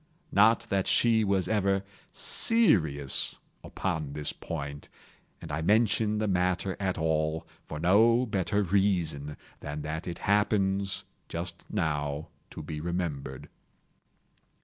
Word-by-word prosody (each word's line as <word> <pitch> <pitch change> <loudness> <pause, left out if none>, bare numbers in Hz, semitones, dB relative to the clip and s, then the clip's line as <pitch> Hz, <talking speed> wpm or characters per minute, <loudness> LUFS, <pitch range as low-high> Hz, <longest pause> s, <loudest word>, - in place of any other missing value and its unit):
Not 105 +3 +5
that 95 -1 +1
she 115 -2 +4
was 100 -2 +1
ever 100 -2 +1 0.3
serious 80 - +2 0.3
upon 80 -7 -3
this 75 0 -2
point—and 70 +1 -9
I 75 +2 -2
mention 105 +3 +2
the 110 0 0
matter 90 0 0
at 95 -2 -1
all 80 0 0 0.2
for 75 - -6
no 115 +8 +4
better 100 -1 0
reason 85 -7 0 0.2
than 75 0 -6
that 80 +3 -4
it 85 - -4
happens, 100 -1 +1 0.3
just 85 +1 -5
now, 75 -5 -2 0.2
to - - -8
be 75 0 -6
remembered. 80 -6 -4
90 Hz, 115 wpm, -28 LUFS, 75-100 Hz, 0.3 s, Not